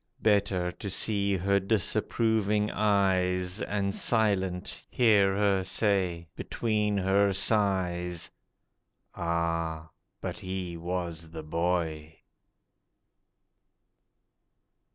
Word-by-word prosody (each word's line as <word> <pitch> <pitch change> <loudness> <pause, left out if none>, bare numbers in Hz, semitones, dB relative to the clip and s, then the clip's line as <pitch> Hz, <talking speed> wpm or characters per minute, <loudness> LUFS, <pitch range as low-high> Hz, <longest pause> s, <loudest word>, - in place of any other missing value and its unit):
Better 100 -4 +2
to 100 - -7
see 100 0 +1
her 100 +2 +2
disapproving 105 +1 +1
eyes, 95 -2 +1
And 100 -1 -1
silent, 95 -6 0
hear 100 -5 +4
her 100 -2 +2
say, 95 -4 0
between 105 -2 -1
her 100 +1 +3
sighs, 90 -4 0 0.8
'Ah, 85 -1 -2 0.3
but - - -5
he 95 -3 -4
was 85 -1 -4
the 80 -1 -8
boy! 80 -1 -2
95 Hz, 80 wpm, -28 LUFS, 85-100 Hz, 0.8 s, hear